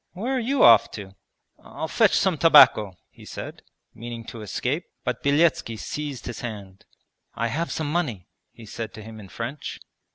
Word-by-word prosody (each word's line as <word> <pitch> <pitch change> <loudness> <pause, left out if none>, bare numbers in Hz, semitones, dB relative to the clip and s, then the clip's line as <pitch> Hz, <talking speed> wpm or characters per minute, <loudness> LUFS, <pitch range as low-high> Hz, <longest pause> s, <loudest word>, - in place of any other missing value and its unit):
'Where 235 +9 -2
are - - +1
you 255 +3 +1
off 115 -2 +7
to?' 100 -3 -9 0.5
'I'll 160 - -6
fetch 220 +4 +3
some 190 -3 +2
tobacco,' 125 - +6
he - - -17
said, - - -8 0.3
meaning 115 0 -8
to 115 - -9
escape, 130 - -3 0.2
but 125 -1 -3
Beletski 140 -5 +2
seized 145 +1 -6
his 120 - -6
hand. 100 -5 -8 0.5
'I 115 +1 -1
have 165 +7 -2
some 155 -2 -3
money,' 140 - -2 0.2
he 115 - -14
said 110 +1 -7
to 110 - -9
him 110 0 -10
in 100 -3 -12
French. 120 +8 -6
120 Hz, 170 wpm, -24 LUFS, 110-160 Hz, 0.5 s, off